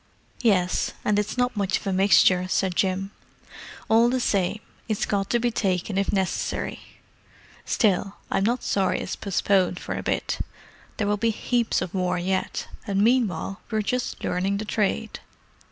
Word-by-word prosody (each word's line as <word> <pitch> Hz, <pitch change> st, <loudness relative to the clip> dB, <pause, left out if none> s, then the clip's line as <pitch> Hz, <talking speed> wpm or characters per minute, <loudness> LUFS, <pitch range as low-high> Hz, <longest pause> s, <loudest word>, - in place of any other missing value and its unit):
"Yes, 185 Hz, -7 st, +2 dB
and 210 Hz, -1 st, +3 dB
it's 210 Hz, +4 st, -3 dB
not 245 Hz, 0 st, +1 dB
much 200 Hz, -1 st, +1 dB
of -, -, -11 dB
a 195 Hz, -, 0 dB
mixture," 185 Hz, -1 st, +5 dB
said 185 Hz, -1 st, 0 dB
Jim. 190 Hz, +1 st, 0 dB, 0.8 s
"All 230 Hz, +2 st, +5 dB
the 255 Hz, +1 st, +1 dB
same, 200 Hz, -3 st, +1 dB, 0.3 s
it's 215 Hz, -, 0 dB
got 200 Hz, -1 st, -1 dB
to 240 Hz, -, +3 dB
be 240 Hz, 0 st, 0 dB
taken 190 Hz, -2 st, -1 dB
if 195 Hz, 0 st, +1 dB
necessary. 190 Hz, -2 st, -1 dB, 0.9 s
Still, 200 Hz, -2 st, +1 dB, 0.2 s
I'm 195 Hz, -, +2 dB
not 240 Hz, +4 st, 0 dB
sorry 195 Hz, -2 st, +1 dB
it's -, -, -4 dB
postponed 190 Hz, -2 st, +1 dB
for -, -, -4 dB
a -, -, -3 dB
bit; -, -, -1 dB, 0.6 s
there 210 Hz, -, 0 dB
will 205 Hz, 0 st, +1 dB
be 230 Hz, +2 st, +1 dB
heaps 235 Hz, +1 st, 0 dB
of 175 Hz, -, -7 dB
war 180 Hz, -1 st, 0 dB
yet, 185 Hz, +2 st, -2 dB, 0.2 s
and 200 Hz, 0 st, +2 dB
meanwhile 220 Hz, -5 st, +1 dB
we're 220 Hz, -2 st, 0 dB
just 250 Hz, +4 st, -2 dB
learning 190 Hz, +2 st, 0 dB
the 215 Hz, -, -4 dB
trade." 215 Hz, +1 st, -1 dB
200 Hz, 165 wpm, -25 LUFS, 190-220 Hz, 0.9 s, mixture